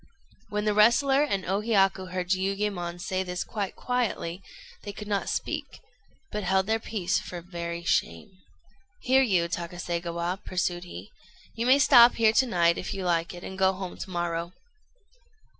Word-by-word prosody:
When 210 0 -2
the 210 - +2
wrestler 255 +6 +4
and 200 -10 -1
O 195 +3 0
Hiyaku 195 -4 +2
heard 180 -1 -3
Jiuyémon 190 -2 -1
say 185 0 -2
this 180 -1 -3
quite 205 -3 -4
quietly, 225 -8 -2 0.4
they 205 - -7
could 210 +2 -8
not 200 -1 -1
speak, - - -4 0.5
but 210 - -3
held 190 +1 +2
their 220 +2 +1
peace 195 -5 -1
for 175 - -7
very 170 -1 -6
shame. 85 - -1 0.7
"Here, 260 +1 +4
you 185 -9 +2
Takaségawa," 170 +1 -4
pursued 180 -1 -2
he; 95 - -10 0.4
"you 230 +2 -2
may 260 +2 +7
stop 250 -4 +7
here 220 -1 +4
to 260 +4 +3
night, 170 -5 +2
if - - -5
you 190 -1 -4
like 170 0 0
it, 175 - -10
and 190 0 -7
go 190 0 +4
home 185 -1 -6
to - - -7
morrow." 175 -1 -3
190 Hz, 165 wpm, -27 LUFS, 175-210 Hz, 0.7 s, may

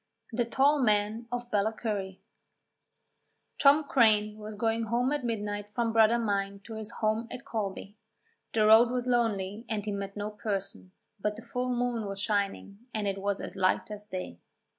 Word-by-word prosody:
THE 235 +1 0
TALL 275 +5 +3
MAN 215 0 +1
OF 245 0 -4
BALLACURRY 205 -2 -1 1.4
Tom 290 +2 +6
Craine 215 -6 +3
was 215 0 -7
going 225 +1 0
home 240 +4 +1
at 295 -2 -1
midnight 205 -3 -3
from 230 +1 -1
Bradda 225 +1 +5
mine 200 -3 -1
to 225 - -9
his 220 0 -6
home 220 0 -1
at 265 - -8
Colby. 205 -4 -4 0.6
The 215 -1 +3
road 220 +2 +7
was 250 0 -1
lonely 225 -4 0
and 215 -2 -2
he 210 - -2
met 200 0 -5
no 205 +1 -3
person, 200 -3 -4 0.3
but 210 +1 -1
the 220 - -10
full 250 +1 -3
moon 240 -3 -1
was 195 0 -5
shining 200 -1 -1 0.2
and 210 -2 -1
it 195 0 -2
was 200 0 0
as - - -6
light 185 +2 +1
as 210 0 -7
day. 185 - -6
215 Hz, 170 wpm, -29 LUFS, 205-235 Hz, 1.4 s, road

